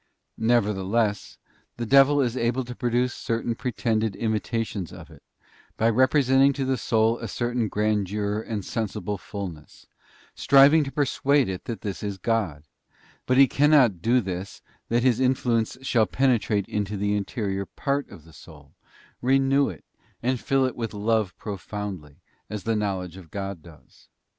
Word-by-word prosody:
Nevertheless, 105 -2 0 0.4
the 120 - -3
devil 140 +3 +5
is 125 -2 0
able 120 +1 0
to 125 - -7
produce 120 +1 0
certain 115 +1 -2
pre 125 +2 -4
tended 110 -3 -1
imitations 110 -4 -2
of - - -12
it, - - -16 0.6
by 115 +1 +3
representing 135 +2 +4
to 135 0 -2
the 130 0 +1
soul 110 +1 +1
a 115 - -5
certain 120 +2 -1
grandeur 105 0 -1
and 110 -4 -5
sensible 105 -3 -3
fulness, 90 -7 -8 0.5
striving 140 +3 +6
to 135 - -6
persuade 140 -1 +1
it 95 -1 -5
that 115 -4 -5
this 100 -2 -5
is 100 -2 -4
God; 95 -8 -1 0.6
but 130 - +2
he 135 0 +8
cannot 145 -2 +4
so 95 - -16
do 120 +4 +3
this 95 -1 -6 0.3
that 120 +1 +1
his 125 -2 +3
influence 125 -3 +1
shall 115 -5 +2
penetrate 120 -6 +1
into 105 0 -3
the 100 +1 0
interior 100 -1 -3
part 140 0 -2
of 80 - -13
the 80 - -17
soul, - - -15 0.5
renew 135 +2 +3
it, - - -10 0.4
and 125 +1 0
fill 135 +2 +1
it 130 - -2
with 115 -3 -4
love 105 -2 0
profoundly, 100 -7 -7 0.3
as 105 -3 -5
the 115 +2 0
knowledge 95 -4 -3
of 90 -4 -13
God 100 -2 -5
does. 80 -1 -18
115 Hz, 155 wpm, -25 LUFS, 100-125 Hz, 0.6 s, he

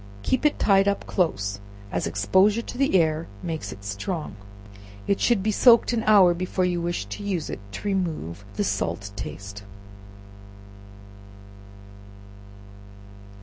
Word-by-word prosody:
Keep 260 +4 +2
it 295 - -2
tied 195 -1 +4
up 200 0 0
close, 100 - -1 0.3
as - - -1
exposure 190 - +2
to - - -8
the 265 -7 +3
air 160 0 0 0.2
makes 160 -2 -4
it 100 - -11
strong. 100 - -4 0.7
It 200 - 0
should 235 -6 +2
be 215 - +1
soaked 235 +2 +5
an 230 - +1
hour 195 -5 +7
before 185 +1 -1
you 175 -1 -1
wish 170 -11 -2
to 100 - -7
use 190 -6 -3
it, - - -5
to 205 - -5
remove 160 - -2
the 105 - 0
salt 100 0 -2
taste. 100 +1 -7
175 Hz, 135 wpm, -25 LUFS, -, 0.7 s, hour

